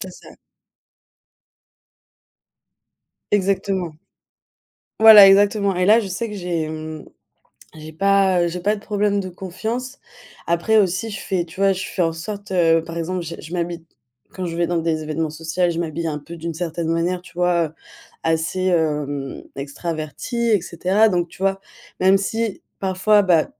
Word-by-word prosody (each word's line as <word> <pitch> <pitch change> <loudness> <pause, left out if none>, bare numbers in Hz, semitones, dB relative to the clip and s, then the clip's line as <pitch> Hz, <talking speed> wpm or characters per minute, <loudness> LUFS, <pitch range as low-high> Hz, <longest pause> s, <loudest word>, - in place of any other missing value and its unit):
c'est - - -6
ça. - - -15 3.0
Exactement. 190 -4 0 1.0
Voilà 220 -2 +11
exactement. 200 0 +4
Et 180 0 +1
là 215 +4 +6
je 210 - -5
sais 210 +5 -3
que 210 - -7
j'ai 175 -3 -2
hem 155 0 -6 0.7
j'ai 155 0 -10
pas, 195 +1 +3
heu - - 0
j'ai 180 +1 -5
pas 205 +4 +1
de - - -10
problème 205 -1 0
de 190 - -5
confiance. 220 +8 -5 0.5
Après 170 +6 +2
aussi 195 +3 +1
je 205 - -6
fais 185 -3 -1
tu 175 +3 -11
vois 195 0 +4
je 190 0 -4
fais 185 - -2
en 165 -1 +1
sorte, 200 +5 -7
heu 165 -3 +3
par 165 +1 -8
exemple 175 +2 -2
j 165 0 -7
je 165 - -8
m'habille 170 -1 -3 0.5
quand 185 -1 -4
je 170 -1 -5
vais 170 - +1
dans 175 0 -1
des 160 -1 -1
événements 155 +1 -2
social, 165 +3 -1
je 165 - -3
m'habille 165 0 -3
un 150 -2 -2
peu 170 +4 -10
d'une 165 0 -5
certaine 165 0 -3
manière 170 +2 0
tu 180 - -17
vois? 175 -1 +2
Heu, 155 - -13 0.5
assez, 165 +3 0
hem, 150 -5 -1
extravertie 155 - -3
et 210 -3 +4
cetera, 185 +6 +2
donc 175 -3 0
tu - - -16
vois, 195 0 +1 0.4
même 190 +1 +5
si 220 +1 -3 0.2
parfois, 195 +2 +3
bah, 175 -5 +3
180 Hz, 170 wpm, -21 LUFS, 165-195 Hz, 3.0 s, Voilà